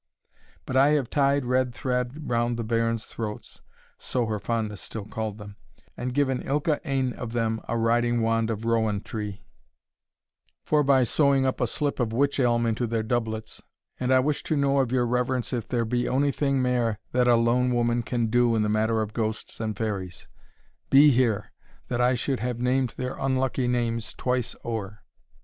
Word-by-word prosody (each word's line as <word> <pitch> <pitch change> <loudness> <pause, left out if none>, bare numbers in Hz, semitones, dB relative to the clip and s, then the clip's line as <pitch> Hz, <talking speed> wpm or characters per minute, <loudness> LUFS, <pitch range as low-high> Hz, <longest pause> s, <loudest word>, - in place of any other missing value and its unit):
But 130 - -4
I 135 +2 +6
have 140 -5 0
tied 140 -1 +2
red 125 -1 +1
thread 125 +5 -2
round 120 0 0
the 115 - -2
bairns's 115 0 0
throats," 105 -2 -7 0.4
(so 125 -2 -1
her 110 -1 -2
fondness 110 -2 -2
still 110 -3 -6
called 110 -1 -4
them,) 105 -1 -11 0.4
"and 125 - -3
given 130 -1 +1
ilka 150 +2 0
ane 130 -2 0
of 120 -2 -6
them 115 -1 0
a 115 - -1
riding 120 +1 +2
wand 115 0 +1
of 110 0 -3
rowan 110 -3 +1
tree, 105 -3 -6 1.2
forby 140 -4 +3
sewing 140 +1 +3
up 130 0 -1
a 125 - +2
slip 145 +5 -2
of 115 -3 0
witch 140 +4 +1
elm 120 -2 +2
into 115 +1 0
their 115 -1 -1
doublets; 110 -1 -3 0.4
and 125 0 0
I 130 0 +5
wish 145 +2 0
to 155 - 0
know 140 0 +2
of 130 -3 +1
your 125 -1 +2
reverence 125 +1 -1
if 120 -3 -2
there 120 -2 0
be 120 +2 0
ony 140 +2 +2
thing 140 -2 0
mair 120 -4 +1
that 125 0 +2
a 120 - +6
lone 120 +2 +2
woman 120 0 +1
can 120 0 -1
do 120 +1 +3
in 110 - +2
the 105 - 0
matter 110 +1 +1
of 105 0 -7
ghosts 110 -1 -3
and 110 -3 -3
fairies? 95 -5 -4 0.6
Be 145 +2 +7
here! 115 -5 +1 0.4
that 120 0 0
I 125 +1 +3
should 130 +2 -1
have 125 0 -2
named 125 0 0
their 125 +1 -3
unlucky 130 -1 0
names 115 -2 -1
twice 125 -2 -1
ower!" 105 -3 -5
120 Hz, 185 wpm, -26 LUFS, 115-130 Hz, 1.2 s, Be